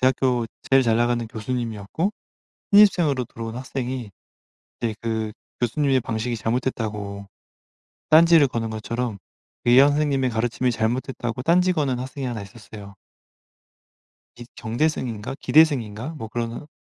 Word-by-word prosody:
대학교 125 -2 +2 0.2
제일 135 0 +6
잘나가는 120 0 +1
교수님이었고 115 - -3 0.6
신입생으로 175 -11 +5
들어온 115 0 -7
학생이 130 -3 -4 0.7
그때 115 -2 -1
그 110 -2 -2 0.3
교수님의 135 +2 +2
방식이 115 0 -3
잘못됐다고 105 -4 -3 0.8
딴지를 160 -2 +6
거는 115 -2 -3
것처럼 115 0 -3 0.5
이황 130 +4 +7
선생님의 145 -3 +1
가르침이 120 +2 0
잘못됐다고 120 +1 -2
딴지 180 +4 +3
거는 140 -7 0
학생이 130 +1 -5
하나 115 -4 -4
있었어요. 100 0 -12 1.4
이 120 - -9
정대승인가? 120 -2 -2
기대승인가? 130 -6 +3
뭐 110 -5 -7
그러는 120 +5 -4
120 Hz, 330 characters per minute, -23 LUFS, 110-135 Hz, 1.4 s, 이황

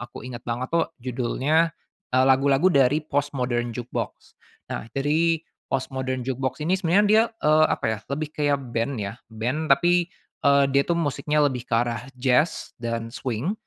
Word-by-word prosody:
aku 120 +1 -9
ingat 125 -2 -7
banget 120 +2 -3
tuh 170 - +2
judulnya, 130 +6 +1 0.4
eee, 130 +1 +4
lagu-lagu 135 +5 +4
dari 140 +1 +4
Postmodern 130 -5 -1
Jukebox. 120 +1 -6 0.4
Nah 115 - -5
jadi, 160 +4 +2 0.4
Postmodern 130 -1 -2
Jukebox 130 +1 -3
ini 180 +4 +2
sebenarnya 190 +3 +3
dia, 215 +2 +6 0.2
eee, 155 +1 +5
apa - - -1
ya - - -10
lebih 150 +2 -2
kayak 145 -2 +1 0.2
band 115 +4 0
ya, 100 +1 -4 0.2
band 125 +8 -2
tapi, 175 +4 +3 0.4
eee, 140 0 +5
dia 140 - +5
tuh 170 - 0
musiknya 150 -1 0
lebih 125 -3 -5
ke - - -15
arah 115 -1 0
jazz 130 +5 +1
dan 115 -1 -3
swing. 130 - -2
135 Hz, 160 wpm, -24 LUFS, 125-155 Hz, 0.4 s, dia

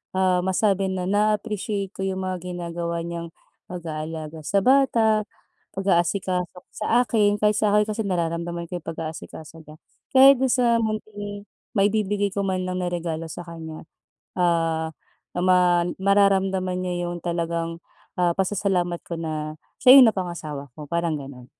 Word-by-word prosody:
ah, 185 -1 +2
masabi 195 0 +1
na 180 -1 -2
na-a-appreciate 210 -1 0
ko - - -6
'yong 190 0 -2
mga 185 -1 -2 0.2
ginagawa 170 -1 -3
niyang 170 -1 -6 0.4
pag-aalaga 160 -2 -6
sa 200 +4 +2
bata, 230 -4 +3 0.5
pag-aasikaso 185 -1 0 0.2
sa 230 +3 +2
akin, 205 -3 +2
kahit 210 0 +3
sa 210 -1 +2
akin 210 0 +4
kasi 215 +1 -2
nararamdaman 170 -1 -2
ko 180 - -3
'yong - - -26
pag-aasikaso 160 0 -7
niya, 155 0 -12 0.4
kaya 270 +1 +9
dun 265 0 +1
sa 235 -2 +3
munting 205 -2 -4 0.3
maibibigay 205 0 +1
ko 200 - -1
man 185 -1 -1
lang 180 - -2
na - - -1
regalo 165 -2 -3
sa 175 - -7
kanya, 160 -2 -8 0.6
ah, 165 -2 +1 0.5
na - - 0
ma 185 0 +5 0.4
mararamdaman 190 -2 +2
niya 175 -1 -2
yung 175 -1 -6
talagang, 170 -1 -2 0.4
ah, 175 -1 +3
pasasalamat 185 -3 0
ko 170 - -4
na 155 -1 -4 0.3
siya 255 0 +9
yung 250 - +8
napangasawa 165 -7 -5
ko, 150 -1 -8
parang 170 -1 0
ganun. 135 -3 -10
180 Hz, 145 wpm, -24 LUFS, 170-205 Hz, 0.6 s, kaya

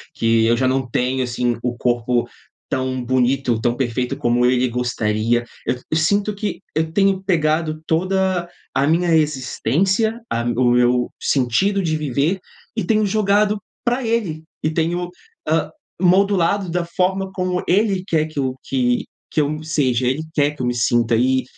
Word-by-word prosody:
que 115 0 +2
eu 115 +1 +4
já 130 +1 +2
não 130 -1 -1
tenho, 125 +2 0
assim, 120 -1 -1
o 120 0 -2
corpo 120 0 +1 0.4
tão 130 -1 -2
bonito, 130 -1 +1
tão 120 +1 0
perfeito 125 -1 -1
como 120 +1 +2
ele 125 0 +2
gostaria. 120 -1 0 0.2
Eu - - +1 0.2
eu 160 - +2
sinto 200 +6 +1
que 205 0 -4
eu 160 +1 0
tenho 195 0 +2
pegado 155 -3 0
toda 185 +1 0 0.3
a 140 - +2
minha 170 +2 +2
existência, 160 - +1
a 115 - 0
o 120 +1 +2
meu 125 0 +2
sentido 145 - +1
de 155 -2 0
viver, 150 +5 0 0.4
e 225 - -1
tenho 215 -2 +2
jogado 210 0 +2 0.2
pra 245 +2 0
ele 205 -9 -1 0.2
e 155 - +2
tenho, 175 +2 -1 0.4
ah, 160 +1 +1 0.3
modulado 190 0 +3
da 175 +1 -1
forma 190 +2 -1
como 185 -2 -2
ele 195 0 +2
quer 155 -4 +2
que 155 -2 -6
eu 130 -2 -1
que 125 -2 +1 0.3
que - - 0
eu 150 +1 -2
seja, 130 -6 +1
ele 135 +5 0
quer 145 -2 +2
que 145 - -8
eu - - 0
me 120 - 0
sinta, 120 -1 +2
e 130 +3 +2
155 Hz, 165 wpm, -20 LUFS, 125-185 Hz, 0.4 s, eu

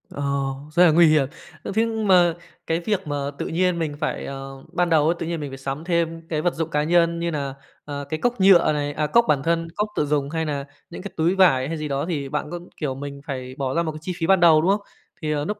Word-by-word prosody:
Ờ, 145 - -7 0.5
rất 175 +3 +5
là 170 - +6
nguy 170 +2 +6
hiểm. 155 -3 +3 0.4
Ơ, - - -4
thế 225 +1 +3
mà 195 -7 +3 0.3
cái 165 +1 +1
việc 190 0 -2
mà 145 - -2 0.2
tự - - -2
nhiên 180 +1 +1
mình 155 -3 -2
phải, 155 - -3
ờ 135 0 -8
ban 175 0 +1
đầu 155 -3 +4
ấy 165 +2 +2
tự - - -3
nhiên 170 0 -3
mình 145 -2 -5
phải 135 - -7
sắm 135 +3 -5
thêm 165 -1 -1
cái 155 -2 -1
vật 175 +2 +1
dụng 160 0 -2
cá 150 -2 0
nhân 170 +1 +2
như 170 0 -1
nà, 140 -3 -3 0.3
à, 145 -1 -5
cái 155 - -3
cốc 245 -3 0
nhựa 190 -5 +6
này, 145 -1 -2
à, 150 +1 -1
cốc 235 +10 +4
bản 140 -3 +2
thân, 165 +1 0
cốc 210 - 0
tự 150 - +1
dùng 145 -1 0
hay 160 +1 -2
nà 140 -2 -3 0.2
những 170 - -8
cái 200 - -7
túi 165 +4 +2
vải 135 -9 +4
hay 165 +2 -3
gì 155 0 -4
đó, 140 0 -1
thì 145 -5 -2
bạn 150 - -3
có, 175 - -4 0.2
kiểu, 140 -4 -2
mình 140 +1 -7
phải 130 -2 -5
bỏ 135 -2 -2
ra 170 - +2
một 160 - -2
cái 155 - -9
chi 180 +3 -4
phí 165 - -1
ban 190 0 +5
đầu, 165 -2 +6
đúng 180 +4 +3
hông? 205 +1 +1 0.4
Thì, 155 -1 -2
ờ, 145 -1 -1
núc 210 +4 -3
160 Hz, 275 wpm, -23 LUFS, 145-175 Hz, 0.5 s, là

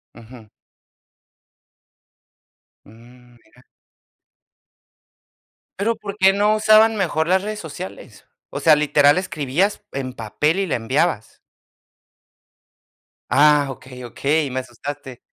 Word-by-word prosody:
Ujú. 115 -1 -14 2.4
Mm, 120 +3 -19
mira. 120 +2 -25 2.2
Pero, 230 +3 0
¿por 200 -1 -8
qué 190 -1 +5
no 205 +2 +2
usaban 215 +1 +5
mejor 165 -5 -1
las 190 +2 +2
redes 215 0 -5
sociales? 120 - -10 0.2
O - - -6
sea, 155 -2 +5
literal 145 +1 +3
escribías 185 +3 -2
en 130 -2 -5
papel 150 - -1
y 195 - 0
la 165 - -2
enviabas. 120 0 -1 1.9
Ah, 150 0 +4
okey, 125 -1 -11
okey, 140 +5 -1
me 130 - -3
asustaste. 130 +1 -9
145 Hz, 100 wpm, -20 LUFS, 125-190 Hz, 2.4 s, qué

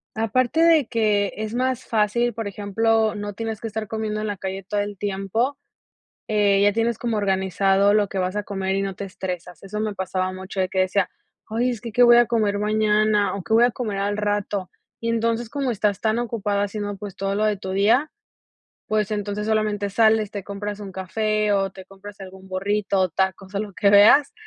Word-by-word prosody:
Aparte 245 +7 +1
de 320 -6 +5
que 210 -4 +1
es 215 +1 -4
más 255 0 -1
fácil, 230 +2 +1
por 225 -1 -4
ejemplo, 220 +2 +1
no 205 0 -5
tienes 220 +1 -5
que 225 - -3
estar 220 -1 -4
comiendo 215 -1 -3
en 215 - -2
la 205 -2 -3
calle 190 0 -5
todo 205 +2 -2
el 205 -1 -3
tiempo, 205 +7 -1 0.7
eh, 205 -2 +3
ya 205 0 +4
tienes 230 0 0
como 230 -3 -2
organizado 195 0 +2
lo 210 -1 +3
que 195 - -6
vas 185 +2 -1
a 210 - -1
comer 195 -1 -2
y 195 - 0
no 195 -1 -3
te 200 - -6
estresas. 180 -2 -6
Eso 210 +2 -5
me 215 -1 -1
pasaba 185 -1 -2
mucho 190 +1 -7
de 185 - +2
que 190 - -1
decía: 185 +1 +2 0.4
"Ay, 235 +3 0
es 235 -2 -4
que 230 -2 -6
qué 245 +2 +1
voy 240 0 +8
a 240 - +6
comer 215 -3 +1
mañana 210 -1 +2
o 195 - -6
qué 220 - -2
voy 230 +2 +6
a 245 - +1
comer 215 -5 -4
al 205 +1 -1
rato". 205 -2 -2 0.3
Y 230 0 -2
entonces, 230 0 0
como 275 0 -2
estás 205 -2 -1
tan 220 0 +1
ocupada 205 -4 -1
haciendo, 205 0 -4
pues, 200 -2 -8
todo 195 +1 -2
lo 215 +1 +1
de 210 -2 +1
tu 190 -1 -6
día, 220 +10 +2 0.8
pues, 215 -1 0
entonces, 210 0 -3
solamente 215 -2 0
sales, 220 0 +3
te 205 -2 -5
compras 205 +1 -6
un 200 -2 -7
café, 215 +3 0
o 195 -1 +1
te 190 -1 -12
compras 195 +1 -13
algún 190 0 -11
burrito, 195 -1 0
tacos, 190 +2 -2
o - - 0
lo 210 -2 -6
que 200 - +3
veas. 215 +8 +6
205 Hz, 210 wpm, -23 LUFS, 195-220 Hz, 0.8 s, voy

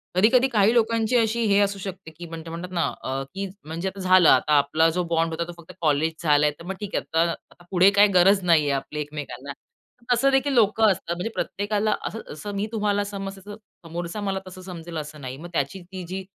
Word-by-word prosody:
कधी-कधी 235 +7 +5
काही 220 -3 +3
लोकांची 230 0 +2
अशी 230 0 +1
हे 200 - +5
असू 200 -1 +1
शकते 190 -3 -7
की 165 +2 -10
ते 165 0 -8
म्हणतात 170 +2 -6
ना, 170 -2 0 0.2
अ, 135 +1 -2
की 195 +1 -3 0.2
म्हणजे 165 +4 -4
आता 195 +1 -6
झालं, 185 -2 +5
आता 145 +3 +4
आपला 155 +3 +3
जो 180 - +1
बॉन्ड 165 0 +1
होता 170 +1 -3
तो - - -6
फक्त 170 -1 -13
कॉलेज 155 0 +2
झालाय, 150 -1 +4
तर 170 - -11
मग 195 +2 -4
ठीक 205 -2 -5
आहे. 160 - -1 0.3
आता 175 - -20
पुढे 185 +1 +6
काही 205 +1 +6
गरज 195 +3 +5
नाहीये 160 -5 +3
आपली 140 +2 -3
एकमेकांना. 145 -2 -7 0.6
तसं 245 +3 +4
देखील 270 +1 +2
लोकं 220 -2 +4
असतात. 170 -2 -3
म्हणजे 180 +6 -3
प्रत्येकाला 205 +1 -1
असं, 225 - -6
असं 205 +7 -7
मी 200 +1 -1
तुम्हाला 205 -2 0
समजते, 195 -1 -6
तसं 205 +2 -9 0.3
समोरचा 170 +5 -5
मला 195 -1 -1
तसं 185 0 -10
समजेल 170 -2 -8
असं 150 -1 -7
नाही. 130 0 -6
मग 170 +4 -9
त्याची 160 +5 -2
ती 185 +1 -9
जी 190 +2 -5
185 Hz, 215 wpm, -24 LUFS, 160-205 Hz, 0.6 s, पुढे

